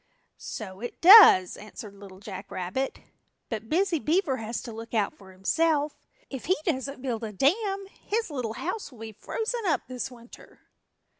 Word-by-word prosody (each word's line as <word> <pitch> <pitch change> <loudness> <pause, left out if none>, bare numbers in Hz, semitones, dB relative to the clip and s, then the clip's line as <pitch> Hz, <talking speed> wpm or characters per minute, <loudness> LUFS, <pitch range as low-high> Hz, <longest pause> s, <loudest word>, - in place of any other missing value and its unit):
"So 190 -4 -7
it 240 +2 -7
does," 345 - +9
answered 210 0 -10
Little 195 -2 -13
Jack 200 -1 -8
Rabbit, 185 +10 -3 0.5
"but 225 -1 -5
Busy 355 0 +1
Beaver 310 -3 +1
has 225 +1 -4
to 235 - -7
look 225 +1 -8
out 210 -3 +1
for 190 -1 -15
himself. 295 - +1 0.3
If 265 -3 -7
he 370 - +2
doesn't 275 -4 -2
build 240 -4 -3
a 220 - -4
dam 390 - +1 0.2
his 445 -4 -2
little 245 -6 -3
house 330 - -4
will 250 - -15
be 225 0 -6
frozen 455 - -4
up 315 - +2
this 255 +1 -4
winter." 240 -1 -15
255 Hz, 165 wpm, -27 LUFS, 215-330 Hz, 0.5 s, does